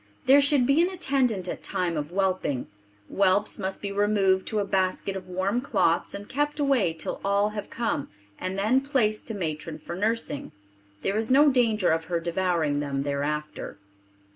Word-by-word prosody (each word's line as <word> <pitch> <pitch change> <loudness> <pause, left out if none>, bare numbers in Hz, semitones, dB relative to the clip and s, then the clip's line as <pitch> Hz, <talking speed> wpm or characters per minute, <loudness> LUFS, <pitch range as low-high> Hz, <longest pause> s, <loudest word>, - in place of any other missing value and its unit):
There 275 +2 +7
should 280 -2 +3
be 275 +5 +4
an 350 - +2
attendant 265 - 0
at - - -5
time 175 -2 -2
of 150 -1 -3
whelping. 185 -8 0 0.4
Whelps 200 +2 +1
must 190 0 -4
be 200 - -3
removed 200 -2 +2
to 215 - -2
a 205 - +1
basket 190 0 0
of 190 - -7
warm 190 +6 -1
cloths 170 -11 +1
and 200 +1 -8
kept 295 +2 -1
away 270 - +2
till 160 - -5
all 200 +1 +2
have 210 -1 -6
come 230 -11 -2 0.3
and 185 +1 -3
then 220 +7 +3
place 240 -7 +1
to 225 - -6
matron 160 -3 -4
for 170 - -7
nursing. 215 -5 -2 0.5
There 195 +2 0
is 220 0 -1
no 285 +3 +6
danger 225 -6 +2
of 160 0 0
her 170 0 -1
devouring 170 -4 0
them 140 -1 -2
thereafter. 145 -2 -3
200 Hz, 175 wpm, -26 LUFS, 175-235 Hz, 0.5 s, There